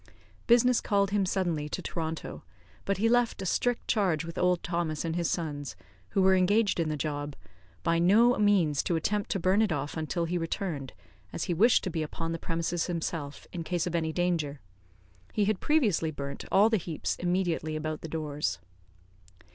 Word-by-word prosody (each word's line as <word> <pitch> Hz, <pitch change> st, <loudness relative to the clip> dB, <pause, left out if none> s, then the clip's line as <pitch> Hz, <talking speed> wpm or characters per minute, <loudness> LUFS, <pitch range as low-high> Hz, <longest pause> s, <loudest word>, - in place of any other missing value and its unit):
Business 245 Hz, +1 st, +5 dB
called 200 Hz, -1 st, +1 dB
him 200 Hz, -2 st, +1 dB
suddenly 170 Hz, -6 st, -1 dB
to -, -, -3 dB
Toronto, 160 Hz, -1 st, -5 dB, 0.4 s
but 200 Hz, -, 0 dB
he 220 Hz, +4 st, +2 dB
left 240 Hz, 0 st, +2 dB
a 190 Hz, -, -4 dB
strict 245 Hz, +6 st, 0 dB
charge 185 Hz, -8 st, +1 dB
with 165 Hz, -, -7 dB
old 180 Hz, -1 st, +1 dB
Thomas 170 Hz, -3 st, -2 dB
and 165 Hz, 0 st, -2 dB
his 170 Hz, -1 st, 0 dB
sons, 145 Hz, -, -3 dB, 0.3 s
who 190 Hz, -, +2 dB
were 190 Hz, 0 st, +6 dB
engaged 195 Hz, +2 st, +3 dB
in 165 Hz, -2 st, +1 dB
the 155 Hz, -, -2 dB
job, 145 Hz, 0 st, -3 dB, 0.5 s
by 165 Hz, -1 st, +2 dB
no 220 Hz, +8 st, +5 dB
means 185 Hz, -9 st, +3 dB
to 170 Hz, -, -1 dB
attempt 205 Hz, +5 st, -1 dB
to 195 Hz, -, 0 dB
burn 185 Hz, +4 st, +3 dB
it 215 Hz, -4 st, +2 dB
off 145 Hz, -1 st, -2 dB
until 165 Hz, +2 st, -1 dB
he 175 Hz, +1 st, -1 dB
returned, 165 Hz, -5 st, -3 dB, 0.4 s
as -, -, -3 dB
he 180 Hz, -, -1 dB
wished 225 Hz, +8 st, +4 dB
to 185 Hz, -, -2 dB
be 160 Hz, -, -2 dB
upon 165 Hz, +2 st, -4 dB
the 165 Hz, -, -3 dB
premises 165 Hz, +1 st, -2 dB
himself, 160 Hz, -4 st, -4 dB
in 170 Hz, -2 st, -4 dB
case 175 Hz, 0 st, -1 dB
of 175 Hz, -, -3 dB
any 160 Hz, -2 st, 0 dB
danger. 160 Hz, -5 st, -1 dB, 0.7 s
He 210 Hz, -, +2 dB
had 210 Hz, -2 st, 0 dB
previously 220 Hz, -, +2 dB
burnt 140 Hz, -2 st, -6 dB
all 210 Hz, +4 st, +5 dB
the 220 Hz, -, +4 dB
heaps 170 Hz, -4 st, -3 dB
immediately 175 Hz, -3 st, -1 dB
about 155 Hz, 0 st, -3 dB
the -, -, -6 dB
doors. 150 Hz, -2 st, -2 dB
170 Hz, 185 wpm, -29 LUFS, 155-195 Hz, 0.7 s, were